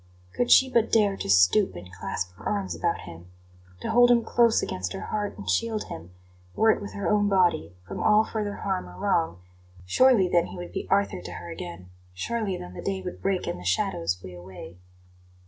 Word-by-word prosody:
Could 245 - 0
she 265 - +7
but 235 -3 +1
dare 205 -3 +3
to - - -5
stoop 90 +1 +4
and 90 +1 -10
clasp 90 0 -4
her 95 - -6
arms 200 -2 -2
about 170 -1 -1
him, 85 0 -11 0.5
to - - -2
hold 245 +1 +6
him 235 -1 +4
close 235 -1 +3
against 90 -1 -3
her - - -6
heart 205 - -3
and 200 - -9
shield 225 -2 0
him, 85 +2 -8 0.5
were 220 0 +5
it - - -1
with 205 - -7
her 200 -3 -3
own 205 +2 +2
body, 175 - +2
from - - -5
all 215 0 +5
further 210 -2 -3
harm 190 - -3
or 90 - -13
wrong; 85 -1 0 0.4
surely 230 - +4
then 175 -1 +2
he - - -9
would 175 0 -7
be - - -5
Arthur 195 - +1
to - - -8
her 85 -1 -8
again; 85 +2 -8 0.2
surely 210 - -2
then 90 0 -9
the - - -7
day 190 -1 -3
would 180 - -7
break 195 -2 0
and - - -4
the - - -10
shadows 90 -1 0
flee 90 0 -11
away. 90 -1 -11
175 Hz, 210 wpm, -26 LUFS, -, 0.5 s, she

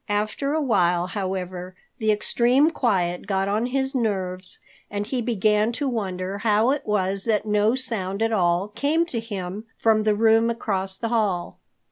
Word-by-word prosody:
After 215 +8 -1
a 315 - +1
while, 180 -8 +2
however, 185 -1 -4 0.2
the 220 -1 +2
extreme 245 +8 +3
quiet 185 - 0
got 195 -1 0
on 215 +4 0
his 265 +1 -1
nerves, 190 -7 -2 0.3
and 205 0 -3
he 250 +2 -2
began 215 -1 +2
to 285 +4 -2
wonder 195 -5 -3
how 215 +3 +3
it 285 -4 -3
was 195 -2 0
that 220 -2 +1
no 210 +2 +2
sound 220 -6 -2
at 225 0 +1
all 180 0 +1
came 285 +10 +1
to 250 -9 -3
him 205 -2 -6
from 220 -1 +3
the 215 -1 +2
room 225 +1 +4
across 195 -5 -2
the 230 - -3
hall. 205 -7 -1
210 Hz, 165 wpm, -24 LUFS, 190-230 Hz, 0.3 s, room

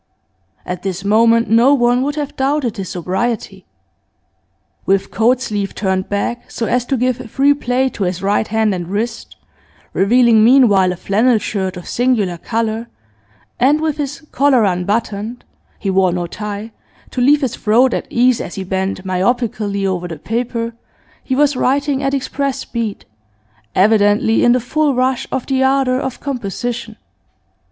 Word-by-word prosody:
At 180 -1 -5
this 190 0 -4
moment 230 +2 +4
no 235 +6 +5
one 245 -1 +2
would 285 +2 -1
have 295 -2 -4
doubted 270 -4 -1
his 190 -3 -5
sobriety. 190 +6 -3 1.2
With 195 0 0
coat 245 +3 +2
sleeve 205 -5 -3
turned 190 -2 -1
back, 220 +4 -3
so 230 - -3
as 245 +1 0
to 270 - -1
give 250 0 -1
free 280 +5 +3
play 260 -2 0
to 200 - -3
his 180 +1 -3
right 205 +2 +1
hand 220 -1 +1
and 175 -2 -4
wrist, 210 +6 -4 0.6
revealing 230 +2 +4
meanwhile 220 -7 +5
a - - -3
flannel 220 +7 +2
shirt 190 -3 -3
of 180 - -9
singular 220 -9 0
colour, 225 +2 -2 0.7
and 280 +5 +4
with 310 -1 -1
his 290 0 -4
collar 270 -3 +3
unbuttoned 205 +5 -2 0.3
(he 195 - -2
wore 190 -1 +3
no 175 0 -2
tie) 210 +4 -6 0.4
to 250 - -2
leave 290 +4 +4
his 260 -4 -1
throat 235 +4 +3
at - - -3
ease 245 0 +2
as - - -7
he 195 - -4
bent 190 0 -3
myopically 200 +1 -1
over 180 -2 -2
the 165 -2 -7
paper, 230 - -3 0.5
he 260 - -1
was 290 0 +3
writing 275 +2 0
at 275 0 0
express 275 0 -2
speed, 230 -4 -4 0.7
evidently 205 +2 +3
in 240 - +5
the 250 - +2
full 285 +3 0
rush 255 0 0
of 265 -2 -2
the 265 -1 +1
ardour 265 -1 +2
of 265 -2 -4
composition. 240 -2 -4
230 Hz, 160 wpm, -17 LUFS, 200-255 Hz, 1.2 s, no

